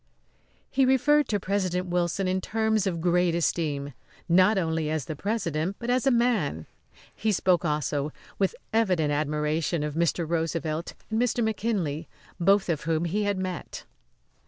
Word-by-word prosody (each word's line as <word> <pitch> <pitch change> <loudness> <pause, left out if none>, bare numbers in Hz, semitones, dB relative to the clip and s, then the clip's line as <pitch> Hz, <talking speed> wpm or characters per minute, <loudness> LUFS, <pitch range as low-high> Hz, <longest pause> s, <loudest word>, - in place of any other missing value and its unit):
He 270 - +3
referred 265 +3 +4
to 205 - 0
President 185 -2 -1
Wilson 180 +1 0
in 185 +1 0
terms 220 -1 0
of 170 -3 -2
great 175 0 +2
esteem 145 -4 -1 0.3
not 185 +4 +5
only 160 -3 0
as 155 -4 -1
the 155 - -5
President 180 -2 -2
but 240 +1 -2
as 255 +2 +1
a - - +7
man. 230 - +1 0.5
He 220 - 0
spoke, 185 -3 +2
also, 150 -2 -1 0.3
with 195 -2 +1 0.2
evident 185 -9 +2
admiration 150 +2 0
of 150 -1 -3
Mr. 170 +1 0
Roosevelt 165 0 -2 0.2
and 220 +1 +1
Mr. 240 -1 +1
McKinley, 200 -8 -1 0.3
both 195 +3 +3
of 160 -5 -2
whom 165 +1 0
he 205 +5 0
had 200 -1 0
met. 185 -2 -5
180 Hz, 155 wpm, -27 LUFS, 160-210 Hz, 0.5 s, a